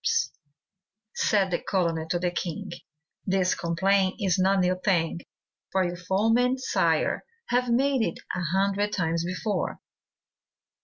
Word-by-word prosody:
Said 195 -3 +2
the 175 - +1
colonel 165 -4 -1
to 175 - +1
the 175 0 -1
king, 180 +3 -4 0.6
'This 185 -1 +2
complaint 190 +3 +1
is 190 -3 +1
no 190 +1 +4
new 185 0 +1
thing, 170 -4 +1 0.5
For 190 0 +2
your 175 0 -2
foemen, 225 +8 +2
sire, 260 - +1 0.3
have 245 0 +1
made 265 +2 +2
it 170 -7 -1 0.2
A 180 - -2
hundred 200 +2 +1
times 165 -2 0
before. 185 +4 -2
190 Hz, 125 wpm, -26 LUFS, 175-205 Hz, 0.6 s, no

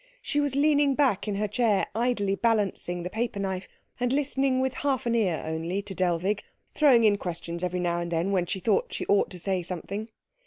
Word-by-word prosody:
She 290 - 0
was 285 -2 0
leaning 290 -1 +3
back 255 -9 +2
in 205 - -1
her 210 +1 0
chair, 210 -1 +2
idly 220 -3 0
balancing 195 -5 0
the 180 - -3
paper 225 -2 -2
knife, 190 -1 -3 0.3
and 245 0 0
listening 270 -1 +1
with 260 0 0
half 270 -2 0
an 235 - +1
ear 195 -9 +1
only 165 +5 -2
to 200 -1 -5
Dellwig, 185 +3 0 0.3
throwing 265 -7 +5
in 205 -2 +4
questions 170 0 -5
every 180 0 -1
now 175 -1 0
and 170 0 -4
then 170 +4 0
when 180 -3 +1
she 190 - -2
thought 460 - +1
she - - -3
ought 200 - +3
to 180 - -8
say 190 +1 0
something. 195 +5 -5
205 Hz, 205 wpm, -27 LUFS, 180-250 Hz, 0.3 s, throwing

